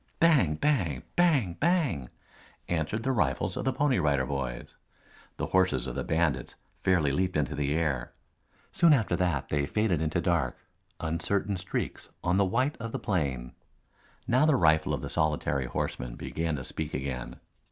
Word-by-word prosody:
Bang, 145 Hz, -, +4 dB
bang, 85 Hz, -, 0 dB
bang, 145 Hz, -, +3 dB
bang! 150 Hz, -, +1 dB, 0.6 s
answered 85 Hz, +7 st, -1 dB
the 135 Hz, -, +1 dB
rifles 90 Hz, -5 st, 0 dB
of -, -, -3 dB
the 130 Hz, -, +2 dB
Pony 135 Hz, -3 st, +2 dB
Rider 70 Hz, -5 st, +2 dB
Boys. 65 Hz, -2 st, -4 dB, 0.6 s
The -, -, -1 dB
horses 95 Hz, 0 st, +3 dB
of -, -, -4 dB
the -, -, -3 dB
bandits 80 Hz, -5 st, 0 dB, 0.3 s
fairly 85 Hz, -7 st, +3 dB
leaped 90 Hz, +4 st, 0 dB
into 75 Hz, 0 st, 0 dB
the 75 Hz, 0 st, 0 dB
air. 70 Hz, -7 st, -1 dB, 0.6 s
Soon 170 Hz, -2 st, +5 dB
after 110 Hz, -10 st, +2 dB
that 90 Hz, -6 st, 0 dB
they 70 Hz, -1 st, 0 dB
faded 105 Hz, -7 st, +1 dB
into 80 Hz, +2 st, 0 dB
dark, 85 Hz, -8 st, 0 dB, 0.4 s
uncertain 85 Hz, +5 st, -1 dB
streaks 90 Hz, -, -4 dB
on 90 Hz, +1 st, +2 dB
the 100 Hz, -, +4 dB
white 125 Hz, +9 st, 0 dB
of 115 Hz, 0 st, -6 dB
the -, -, -1 dB
plain. 70 Hz, -, -2 dB, 0.7 s
Now 130 Hz, +6 st, +4 dB
the 155 Hz, -, +5 dB
rifle 80 Hz, -4 st, +3 dB
of -, -, -7 dB
the -, -, -3 dB
solitary 75 Hz, -4 st, 0 dB
horseman -, -, -3 dB
began 80 Hz, -1 st, -2 dB
to 65 Hz, -, -5 dB
speak 75 Hz, +4 st, -5 dB
again. 65 Hz, -2 st, -4 dB
85 Hz, 165 wpm, -29 LUFS, 70-105 Hz, 0.7 s, Soon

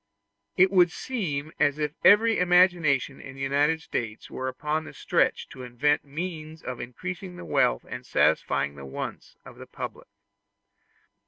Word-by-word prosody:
It 185 Hz, +1 st, +5 dB
would 180 Hz, -3 st, +5 dB
seem 160 Hz, -, -3 dB
as 145 Hz, 0 st, +3 dB
if 150 Hz, -1 st, -1 dB
every 225 Hz, +3 st, +6 dB
imagination 175 Hz, -7 st, +3 dB
in 135 Hz, -, -10 dB
the 135 Hz, -, -9 dB
United 145 Hz, +4 st, +1 dB
States 110 Hz, -7 st, -5 dB
were 130 Hz, -, -4 dB
upon 150 Hz, +4 st, -2 dB
the -, -, -11 dB
stretch -, -, +1 dB
to 130 Hz, -, -10 dB
invent 125 Hz, +4 st, +1 dB
means 160 Hz, +1 st, -6 dB
of 125 Hz, -1 st, -5 dB
increasing 180 Hz, +9 st, -6 dB
the 180 Hz, -, -9 dB
wealth -, -, +1 dB
and -, -, -7 dB
satisfying 70 Hz, -, +1 dB
the 70 Hz, -1 st, -11 dB
wants 65 Hz, -, -7 dB
of -, -, -12 dB
the -, -, -10 dB
public. -, -, -7 dB
150 Hz, 155 wpm, -26 LUFS, 135-180 Hz, -, every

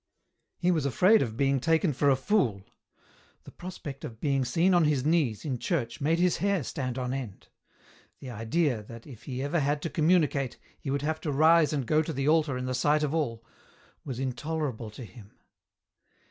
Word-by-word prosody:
He 180 Hz, 0 st, +2 dB
was 155 Hz, -5 st, +1 dB
afraid 185 Hz, -, +4 dB
of 110 Hz, -3 st, -3 dB
being 135 Hz, 0 st, +2 dB
taken 160 Hz, +3 st, +2 dB
for 140 Hz, +2 st, +2 dB
a 135 Hz, -, +5 dB
fool; 130 Hz, -, 0 dB, 0.8 s
the -, -, -12 dB
prospect 175 Hz, -6 st, -8 dB
of 110 Hz, -2 st, -8 dB
being 135 Hz, -3 st, +1 dB
seen 165 Hz, +9 st, +2 dB
on 175 Hz, -2 st, +4 dB
his 145 Hz, -3 st, +1 dB
knees, 150 Hz, -9 st, +1 dB
in 130 Hz, -5 st, -2 dB
church, 130 Hz, -9 st, -2 dB
made 160 Hz, +4 st, +2 dB
his 180 Hz, 0 st, +2 dB
hair 200 Hz, -4 st, 0 dB
stand 125 Hz, -1 st, -4 dB
on 125 Hz, 0 st, -2 dB
end; 125 Hz, -8 st, -7 dB, 0.7 s
the 130 Hz, -, -9 dB
idea, 120 Hz, +3 st, 0 dB
that, 115 Hz, +2 st, -11 dB
if 120 Hz, -6 st, -13 dB
he 130 Hz, -1 st, -4 dB
ever 145 Hz, +4 st, 0 dB
had 145 Hz, +1 st, 0 dB
to 165 Hz, -, -3 dB
communicate, 155 Hz, -5 st, +2 dB, 0.2 s
he 140 Hz, -, -6 dB
would 140 Hz, +1 st, -1 dB
have 155 Hz, +1 st, -2 dB
to 155 Hz, -, -2 dB
rise 155 Hz, +2 st, +5 dB
and 140 Hz, -4 st, -1 dB
go 155 Hz, +5 st, +3 dB
to 160 Hz, +1 st, -4 dB
the 135 Hz, +1 st, -2 dB
altar 155 Hz, -4 st, +2 dB
in 125 Hz, -, -4 dB
the 130 Hz, -, -2 dB
sight 150 Hz, +4 st, +2 dB
of 150 Hz, 0 st, -1 dB
all, 115 Hz, -8 st, -2 dB, 0.6 s
was 130 Hz, -4 st, -5 dB
intolerable 130 Hz, -2 st, -3 dB
to 115 Hz, +3 st, -9 dB
him. 100 Hz, +1 st, -15 dB
140 Hz, 195 wpm, -28 LUFS, 125-160 Hz, 0.8 s, a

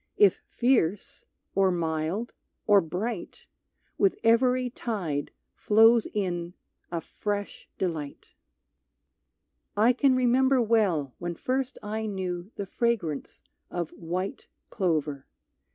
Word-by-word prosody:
If 415 Hz, -, +5 dB
fierce, 220 Hz, -7 st, 0 dB, 0.3 s
or 195 Hz, -1 st, +3 dB
mild, 170 Hz, +5 st, -2 dB, 0.3 s
or 205 Hz, -2 st, +6 dB
bright, 180 Hz, +5 st, -5 dB, 0.5 s
With 395 Hz, -1 st, +3 dB
every 250 Hz, +2 st, +4 dB
tide 180 Hz, -, -3 dB, 0.3 s
flows 225 Hz, +2 st, +5 dB
in 175 Hz, -3 st, -2 dB, 0.4 s
a 170 Hz, -1 st, -2 dB
fresh 205 Hz, +2 st, -4 dB
delight. 160 Hz, -6 st, -4 dB, 1.4 s
I 225 Hz, +4 st, +5 dB
can 260 Hz, +1 st, +3 dB
remember 255 Hz, +1 st, +3 dB
well 200 Hz, -, +2 dB
when 175 Hz, 0 st, -4 dB
first 260 Hz, -, -2 dB
I 220 Hz, +1 st, -3 dB
knew 185 Hz, -2 st, -4 dB
The 200 Hz, -, -4 dB
fragrance 195 Hz, -, -2 dB, 0.3 s
of 175 Hz, -3 st, -3 dB
white 180 Hz, +3 st, -4 dB, 0.2 s
clover. 155 Hz, -7 st, -1 dB
200 Hz, 105 wpm, -27 LUFS, 170-235 Hz, 1.4 s, or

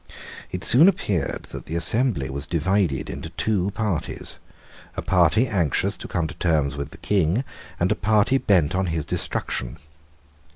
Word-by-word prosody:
It 90 Hz, +1 st, -4 dB
soon 145 Hz, +9 st, +6 dB
appeared 100 Hz, -, -2 dB
that -, -, -8 dB
the 80 Hz, -, -4 dB
assembly 85 Hz, -, +1 dB
was 70 Hz, +2 st, -5 dB
divided 85 Hz, -3 st, 0 dB
into -, -, -6 dB
two 95 Hz, +3 st, 0 dB
parties, 100 Hz, -5 st, -3 dB, 0.6 s
a -, -, -2 dB
party 95 Hz, +6 st, +3 dB
anxious 90 Hz, -, 0 dB
to -, -, -8 dB
come 85 Hz, -2 st, -1 dB
to -, -, -5 dB
terms 75 Hz, -5 st, 0 dB
with 70 Hz, 0 st, -4 dB
the -, -, -13 dB
King, 95 Hz, -, +1 dB, 0.4 s
and 90 Hz, +3 st, +1 dB
a -, -, +3 dB
party 105 Hz, +7 st, +2 dB
bent 90 Hz, -, +2 dB
on 95 Hz, 0 st, 0 dB
his 80 Hz, -3 st, -2 dB
destruction. 60 Hz, +1 st, -3 dB
90 Hz, 160 wpm, -23 LUFS, 80-105 Hz, 0.6 s, soon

